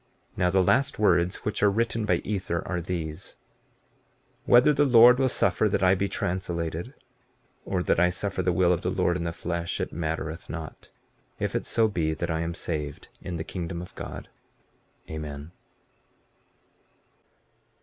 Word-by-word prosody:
15:34 -, -, -30 dB
Now 90 Hz, -1 st, +2 dB
the 95 Hz, +1 st, +3 dB
last 135 Hz, +8 st, +2 dB
words 90 Hz, -3 st, +3 dB
which 105 Hz, -, -2 dB
are 105 Hz, -, +5 dB
written 115 Hz, +1 st, 0 dB
by -, -, +4 dB
Ether 95 Hz, -4 st, -3 dB
are 90 Hz, -2 st, -2 dB
these: 85 Hz, -1 st, -5 dB, 1.1 s
Whether 125 Hz, +5 st, +6 dB
the 145 Hz, 0 st, +3 dB
Lord 125 Hz, -1 st, +7 dB
will 135 Hz, -, +3 dB
that 120 Hz, -, +1 dB
I 90 Hz, 0 st, +5 dB
be 95 Hz, +1 st, 0 dB
translated, 85 Hz, -2 st, -3 dB, 0.7 s
or 90 Hz, -2 st, -1 dB
that -, -, +2 dB
I 90 Hz, +1 st, +5 dB
suffer 95 Hz, +1 st, -3 dB
the 90 Hz, -, +1 dB
will 90 Hz, 0 st, +3 dB
of 85 Hz, -, -2 dB
the -, -, -1 dB
Lord 85 Hz, -, +1 dB
in 85 Hz, -2 st, -3 dB
the 85 Hz, -, -1 dB
flesh, 85 Hz, 0 st, -3 dB
it -, -, -3 dB
mattereth 80 Hz, 0 st, -4 dB
not, 80 Hz, -2 st, -8 dB, 0.5 s
if -, -, -2 dB
it -, -, -2 dB
so 115 Hz, -1 st, +3 dB
be 80 Hz, -6 st, -1 dB
that 85 Hz, +1 st, -3 dB
I 80 Hz, -, -1 dB
am 85 Hz, +1 st, -3 dB
saved 75 Hz, -4 st, -4 dB
in 90 Hz, -, -5 dB
the 80 Hz, -, -3 dB
kingdom 85 Hz, -1 st, -5 dB
of 90 Hz, -, -9 dB
God. -, -, -7 dB, 0.8 s
Amen. 75 Hz, 0 st, -7 dB
90 Hz, 165 wpm, -26 LUFS, 85-100 Hz, 1.1 s, Lord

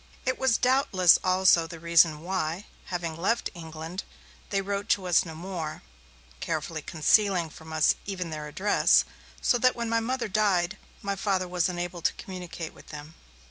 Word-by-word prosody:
It 255 Hz, 0 st, 0 dB
was 260 Hz, -4 st, +3 dB
doubtless 250 Hz, -9 st, +4 dB
also 185 Hz, -2 st, +4 dB
the 165 Hz, 0 st, -9 dB
reason 165 Hz, -2 st, +4 dB
why, 175 Hz, +1 st, -2 dB, 0.2 s
having 170 Hz, -3 st, -4 dB
left 210 Hz, +8 st, 0 dB
England, 165 Hz, +1 st, -7 dB, 0.5 s
they 200 Hz, -, 0 dB
wrote 200 Hz, +1 st, -3 dB
to 195 Hz, -2 st, +2 dB
us 180 Hz, 0 st, +3 dB
no 160 Hz, -2 st, -8 dB
more, 165 Hz, -, -6 dB, 0.6 s
carefully 160 Hz, 0 st, -3 dB
concealing 175 Hz, +2 st, +2 dB
from 160 Hz, +1 st, -12 dB
us 155 Hz, -1 st, +4 dB
even 180 Hz, -4 st, -4 dB
their 150 Hz, -1 st, -5 dB
address, 195 Hz, +7 st, +3 dB, 0.4 s
so 245 Hz, -, +3 dB
that 255 Hz, +1 st, +3 dB
when 235 Hz, -1 st, -3 dB
my 230 Hz, -, +3 dB
Mother 250 Hz, +1 st, -2 dB
died, 200 Hz, -2 st, +1 dB, 0.2 s
my 200 Hz, 0 st, -1 dB
Father 190 Hz, -2 st, 0 dB
was 180 Hz, 0 st, 0 dB
unable 175 Hz, -1 st, -4 dB
to -, -, +1 dB
communicate 180 Hz, -3 st, -7 dB
with -, -, -17 dB
them. 150 Hz, +1 st, -9 dB
180 Hz, 165 wpm, -27 LUFS, 165-200 Hz, 0.6 s, doubtless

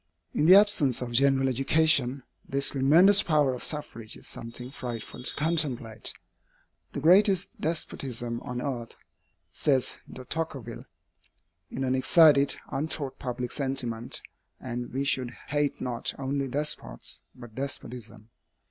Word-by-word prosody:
In 150 Hz, -, +2 dB
the 185 Hz, -, +10 dB
absence 200 Hz, -, +4 dB
of 120 Hz, -, -6 dB
general 135 Hz, +2 st, +3 dB
education, 135 Hz, 0 st, +2 dB, 0.3 s
this 140 Hz, 0 st, +1 dB
tremendous 165 Hz, +9 st, +6 dB
power 150 Hz, -5 st, +2 dB
of 125 Hz, -, -6 dB
suffrage 115 Hz, -7 st, -4 dB
is -, -, -12 dB
something 120 Hz, +2 st, -7 dB
frightful 120 Hz, -3 st, -7 dB
to 125 Hz, -, -3 dB
contemplate. 145 Hz, -8 st, -1 dB, 0.8 s
"The -, -, -3 dB
greatest 185 Hz, +4 st, +4 dB
despotism 125 Hz, -7 st, -3 dB
on 125 Hz, 0 st, -5 dB
earth," 120 Hz, -5 st, -4 dB, 0.6 s
says 135 Hz, -4 st, +1 dB
De 130 Hz, -, -9 dB
Tocqueville, 135 Hz, -7 st, -5 dB, 0.8 s
"is 135 Hz, -, -4 dB
an 130 Hz, -1 st, +1 dB
excited, 140 Hz, +1 st, +5 dB, 0.2 s
untaught 140 Hz, -1 st, -3 dB
public 125 Hz, -2 st, -4 dB
sentiment; 125 Hz, -5 st, -2 dB, 0.4 s
and 120 Hz, -1 st, -5 dB
we 135 Hz, +2 st, -1 dB
should 125 Hz, -3 st, 0 dB
hate 145 Hz, -1 st, 0 dB
not 120 Hz, -2 st, -2 dB
only 140 Hz, 0 st, -2 dB
despots, 130 Hz, -, -3 dB
but 120 Hz, -3 st, -12 dB
despotism. 115 Hz, -4 st, -6 dB
135 Hz, 125 wpm, -27 LUFS, 120-150 Hz, 0.8 s, the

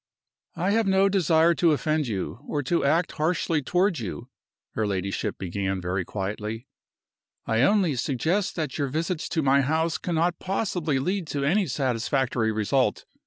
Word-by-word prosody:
"I 185 Hz, +3 st, 0 dB
have 225 Hz, 0 st, +2 dB
no 195 Hz, +1 st, +4 dB
desire 170 Hz, -3 st, +4 dB
to 170 Hz, -1 st, +3 dB
offend 155 Hz, -1 st, 0 dB
you, 105 Hz, 0 st, -4 dB
or 145 Hz, -1 st, -2 dB
to 170 Hz, +6 st, 0 dB
act 160 Hz, +5 st, +2 dB
harshly 160 Hz, 0 st, 0 dB
toward 180 Hz, +4 st, +1 dB
you," 90 Hz, -10 st, -6 dB, 0.4 s
her 110 Hz, -1 st, -1 dB
ladyship 100 Hz, 0 st, -2 dB
began, 95 Hz, +1 st, -2 dB
very 90 Hz, +1 st, -2 dB
quietly. 105 Hz, +5 st, -4 dB, 0.8 s
"I 115 Hz, 0 st, +1 dB
only 180 Hz, 0 st, +3 dB
suggest 160 Hz, -, 0 dB
that 155 Hz, -3 st, -3 dB
your 140 Hz, -, +1 dB
visits 160 Hz, +4 st, -2 dB
to 160 Hz, -3 st, 0 dB
my 140 Hz, 0 st, +4 dB
house 160 Hz, +3 st, 0 dB
cannot 170 Hz, 0 st, 0 dB
possibly 180 Hz, -6 st, -1 dB
lead 180 Hz, +5 st, -1 dB
to 140 Hz, -2 st, -2 dB
any 190 Hz, +6 st, +2 dB
satisfactory 125 Hz, -3 st, 0 dB
result. 110 Hz, +5 st, 0 dB
150 Hz, 155 wpm, -25 LUFS, 115-170 Hz, 0.8 s, no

